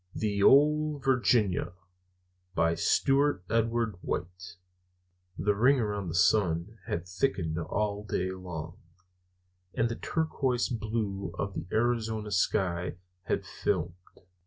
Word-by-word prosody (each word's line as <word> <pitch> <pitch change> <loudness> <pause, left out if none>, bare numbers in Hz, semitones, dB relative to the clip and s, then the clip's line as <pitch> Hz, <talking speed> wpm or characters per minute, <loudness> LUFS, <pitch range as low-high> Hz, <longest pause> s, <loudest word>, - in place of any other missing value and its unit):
The 100 -2 -1
Ole 150 +5 +5
Virginia 120 - +2 0.8
By 85 0 +3
Stewart 135 - +2
Edward 115 -2 +1
White 90 +1 -5 0.8
THE 105 +1 +2
ring 130 +7 +4
around 105 -4 -2
the 80 - -4
sun 90 +2 +2
had 85 +2 -3
thickened 90 -5 -1
all 100 +5 -2
day 95 -3 -2
long, 90 -1 -7 1.0
and 115 +1 +1
the 115 - -3
turquoise 135 -5 -1
blue 105 -5 -3
of 100 0 -3
the - - -5
Arizona 110 -2 0
sky 90 -2 0 0.3
had - - -1
filmed. 90 -4 -1
105 Hz, 110 wpm, -29 LUFS, 90-120 Hz, 1.0 s, Ole